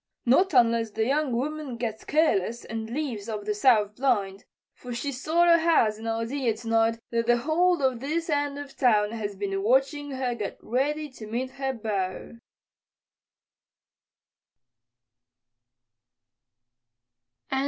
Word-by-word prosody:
"Not 355 +11 +4
unless 230 -2 +4
the 220 +1 -1
young 285 +2 +1
woman 275 +1 -3
gets 225 -2 -4
careless 235 - +1
and 225 0 -5
leaves 235 -6 -4
up 210 -2 -4
that 210 - 0
south 210 -2 +3
blind. 205 -7 0 0.3
For 245 -1 -8
she 280 +4 -3
sort 315 +6 +1
o' 335 0 +6
has 240 -10 +2
an 225 - -6
idea 230 +1 -1
tonight 225 0 +1
that 230 0 0
the 240 0 +4
whole 320 +5 +2
of 260 -3 +1
this 315 +6 -2
end 290 -2 -1
of 285 -1 -8
town 210 -5 +3
has 210 -3 -4
been 195 0 -3
watching 270 +6 +1
her 260 -2 -2
get 210 -4 -5
ready 295 +5 -1
to 235 -5 -11
meet 250 +4 -3
her 270 0 -3
beau." 210 -1 -4
240 Hz, 130 wpm, -26 LUFS, 220-285 Hz, 0.3 s, o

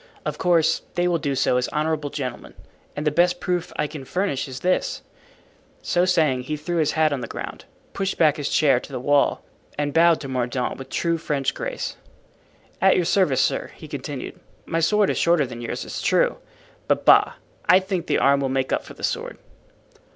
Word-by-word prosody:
Of - - -3
course 170 -3 +3
they 175 0 +1
will 170 -2 +1
do 145 -3 -1
so 130 -1 +2
as 125 - 0
honorable 155 -1 -1
gentlemen, 130 -4 -6 0.4
and 150 - -4
the 150 - +3
best 175 +3 +2
proof 180 -1 -2
I 150 - 0
can 150 -2 -7
furnish 180 -1 -2
is 130 -1 -8
this——" 185 - 0 0.8
So 175 0 +2
saying, 155 -8 +2
he 150 +4 -4
threw 170 +4 -3
his 155 -3 +1
hat 155 -2 +2
on 135 - -3
the - - -5
ground, - - -7 0.3
pushed 195 -1 -2
back 155 -3 +4
his 145 -1 -2
chair 140 -5 +3
to 140 - -12
the 130 - -4
wall 145 +2 +2 0.3
and 145 -1 -1
bowed 165 0 +5
to 140 - -6
Mordaunt 125 -1 -2
with 135 - -9
true 170 -1 0
French 145 -4 -1
grace. - - -4 0.8
"At 190 0 +5
your 180 - +1
service, 165 -8 +2
sir," - - 0
he - - -11
continued. - - -6 0.3
"My 165 - -1
sword 205 +5 +3
is - - -2
shorter 170 -4 +3
than 120 -1 -8
yours, 120 - -4
it's - - -5
true, - - +2 0.5
but, - - +1
bah! - - +6 0.4
I 185 - +8
think 185 -3 -3
the - - +2
arm 140 0 +4
will 135 -1 -1
make 130 0 -1
up - - 0
for - - -12
the - - -13
sword." - - -2
155 Hz, 200 wpm, -23 LUFS, 135-175 Hz, 0.8 s, I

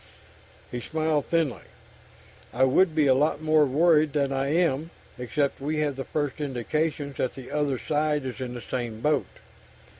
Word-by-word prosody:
He 125 - -3
smiled 155 0 -1
thinly. 165 -6 0 0.9
"I 125 +4 +1
would 155 +6 +4
be 155 -2 +3
a 135 - +5
lot 145 +3 +1
more 155 -1 +3
worried 155 +1 +3
than 140 -2 +1
I 135 0 0
am 160 -1 +1 0.3
except 140 +3 -1
we 150 +3 -2
have 145 -2 0
the 135 - -4
first 145 -1 -3
indications 145 +2 -2
that 130 - -1
the 130 -2 -9
other 145 -3 0
side 150 0 0
is 130 0 -5
in 125 -1 -4
the 120 - -6
same 115 -2 -4
boat. 150 0 +1
145 Hz, 170 wpm, -26 LUFS, 130-155 Hz, 0.9 s, a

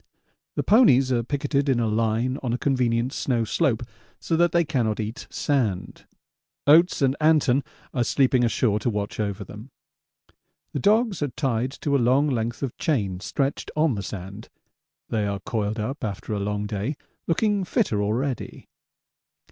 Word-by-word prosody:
The - - 0
ponies 135 - +5
are 120 -2 +2
picketed 140 +2 -1
in 130 -3 +2
a 115 - +1
line 115 +4 0
on 120 -3 -2
a - - 0
convenient 125 -2 0
snow 120 -4 0
slope 120 0 0 0.4
so 165 - -1
that 175 +1 +3
they 170 0 +3
cannot 120 -8 0
eat 110 +2 -5
sand. 110 -11 -2 0.6
Oates 160 +1 +5
and 135 0 +3
Anton 150 -4 +3 0.3
are 125 - +1
sleeping 130 0 +2
ashore 115 -2 +1
to 115 - -1
watch 105 -1 -3
over 100 -2 -2
them. 105 +5 -11 1.0
The - - -1
dogs 215 -2 +2
are 145 - +1
tied 125 -2 -1
to 140 -1 +1
a 135 - +3
long 130 +5 +3
length 120 -2 -2
of 130 - -3
chain 100 - 0
stretched 135 +7 -2
on 155 -2 +2
the 100 - -3
sand; 100 +2 -8 0.6
they 105 -2 0
are 100 -1 -2
coiled 110 +1 -2
up 125 +7 -4
after 105 0 -4
a 105 - -1
long 105 +1 -2
day, 105 +7 -3 0.3
looking 205 +3 +1
fitter 180 - 0
already. 120 +6 -3
125 Hz, 165 wpm, -24 LUFS, 110-145 Hz, 1.0 s, ponies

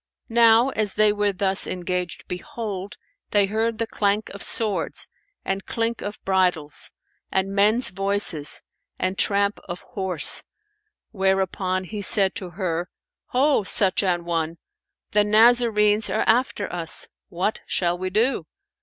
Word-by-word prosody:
Now 230 +2 +5
as 215 -6 -1
they 215 -1 +4
were 205 -1 0
thus 195 0 +1
engaged 180 -1 -4
behold, 205 -3 -6 0.3
they 205 -1 +3
heard 220 +3 -1
the 230 - -1
clank 210 -1 -1
of 200 - -10
swords 215 -3 0 0.4
and 195 0 -2
clink 230 0 -2
of 205 +1 -6
bridles 180 -6 +2 0.4
and 190 +1 -1
men's 215 +5 +2
voices 195 -5 +1 0.3
and 185 +1 -2
tramp 200 +1 +1
of 175 +1 -6
horse; 185 -6 +3 0.7
whereupon 190 -1 -1
he 205 +3 -7
said 195 -1 +4
to 190 -5 -6
her, 175 -1 -3 0.4
"Ho, 275 0 +2
such 190 -1 +3
an 175 -3 -1
one, 165 -1 -2 0.5
the 210 0 +3
Nazarenes 215 -1 +3
are 220 - 0
after 225 -3 +1
us! 170 -2 +1 0.2
What 190 +4 -2
shall 175 -1 0
we 185 +1 -4
do? 220 -3 0
200 Hz, 135 wpm, -23 LUFS, 185-215 Hz, 0.7 s, Now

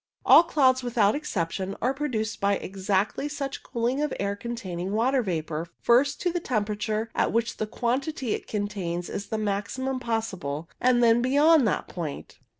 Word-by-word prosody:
All - - +9
clouds, 265 -6 +3
without 225 -4 +2
exception, 190 - -3
are 255 +2 +1
produced 245 -8 -3
by 200 0 +3
exactly 195 +8 -1
such 280 -2 -4
cooling 245 +3 -1
of 300 - 0
air 200 0 -1
containing 200 -5 -5
water 255 +5 +2
vapour, 165 -5 -3
first 270 +4 +3
to 355 - +1
the 350 - -1
temperature 215 -3 -2
at - - +1
which 230 +1 0
the 215 - -2
quantity 255 +2 -1
it - - -5
contains 195 -5 -3
is 200 - -4
the 220 - -2
maximum 215 +6 -2
possible, 190 - -3
and 245 -1 +4
then 230 0 +5
beyond 285 +2 +5
that 205 - -1
point. 160 -5 -6
225 Hz, 160 wpm, -26 LUFS, 200-260 Hz, -, All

